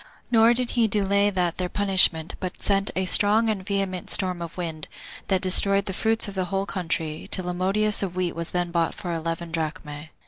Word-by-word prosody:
Nor 230 Hz, 0 st, +4 dB
did 250 Hz, 0 st, -3 dB
he 235 Hz, -2 st, +1 dB
delay 200 Hz, 0 st, +1 dB
that 180 Hz, -3 st, -2 dB
their 180 Hz, -1 st, -2 dB
punishment, 190 Hz, -5 st, +3 dB
but 185 Hz, -1 st, -6 dB
sent 195 Hz, 0 st, 0 dB
a 190 Hz, -, -1 dB
strong 210 Hz, +4 st, +3 dB
and 195 Hz, -3 st, -5 dB
vehement 195 Hz, -2 st, -3 dB
storm 185 Hz, -2 st, +1 dB
of 170 Hz, 0 st, -8 dB
wind, 160 Hz, -4 st, -6 dB, 0.4 s
that 190 Hz, -2 st, 0 dB
destroyed 195 Hz, +1 st, +5 dB
the 190 Hz, -, -4 dB
fruits 225 Hz, +3 st, +1 dB
of 200 Hz, -, -7 dB
the 190 Hz, -1 st, -2 dB
whole 195 Hz, +2 st, -3 dB
country, 165 Hz, -5 st, -5 dB
till 185 Hz, -2 st, +4 dB
a 180 Hz, -, -3 dB
modius 200 Hz, +4 st, 0 dB
of 185 Hz, -3 st, -4 dB
wheat 180 Hz, -2 st, -2 dB
was 170 Hz, 0 st, -6 dB
then 175 Hz, -1 st, -3 dB
bought 170 Hz, -1 st, -1 dB
for 175 Hz, -2 st, -6 dB
eleven 165 Hz, +1 st, -5 dB
drachmae. 155 Hz, -2 st, -6 dB
185 Hz, 205 wpm, -23 LUFS, 170-200 Hz, 0.4 s, destroyed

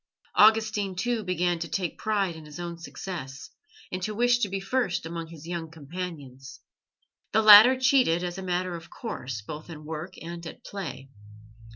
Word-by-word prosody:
Augustine, 215 Hz, -3 st, +4 dB
too, 235 Hz, +4 st, -1 dB
began 180 Hz, -2 st, 0 dB
to 170 Hz, -, -3 dB
take 175 Hz, +1 st, -2 dB
pride 200 Hz, -5 st, 0 dB
in 160 Hz, -1 st, -11 dB
his 150 Hz, +2 st, -10 dB
own 170 Hz, -1 st, -5 dB
success, 165 Hz, -5 st, -7 dB, 0.4 s
and 185 Hz, -, -3 dB
to 215 Hz, +3 st, -3 dB
wish 240 Hz, +2 st, +3 dB
to 205 Hz, -, 0 dB
be 195 Hz, +1 st, -2 dB
first 195 Hz, -3 st, -1 dB
amongst 165 Hz, 0 st, -5 dB
his 160 Hz, -2 st, -11 dB
young 170 Hz, -2 st, -4 dB
companions. 145 Hz, -5 st, -8 dB, 0.7 s
The 220 Hz, -, +4 dB
latter 215 Hz, +5 st, +10 dB
cheated 255 Hz, -10 st, +3 dB
as 175 Hz, +1 st, -4 dB
a -, -, -5 dB
matter 180 Hz, -1 st, -1 dB
of 165 Hz, 0 st, -10 dB
course, 130 Hz, -, -6 dB
both 150 Hz, +8 st, -8 dB
in 155 Hz, -2 st, -9 dB
work 160 Hz, +4 st, -6 dB
and 170 Hz, +1 st, -7 dB
at -, -, -11 dB
play. 140 Hz, -9 st, -7 dB
175 Hz, 175 wpm, -27 LUFS, 160-205 Hz, 0.7 s, latter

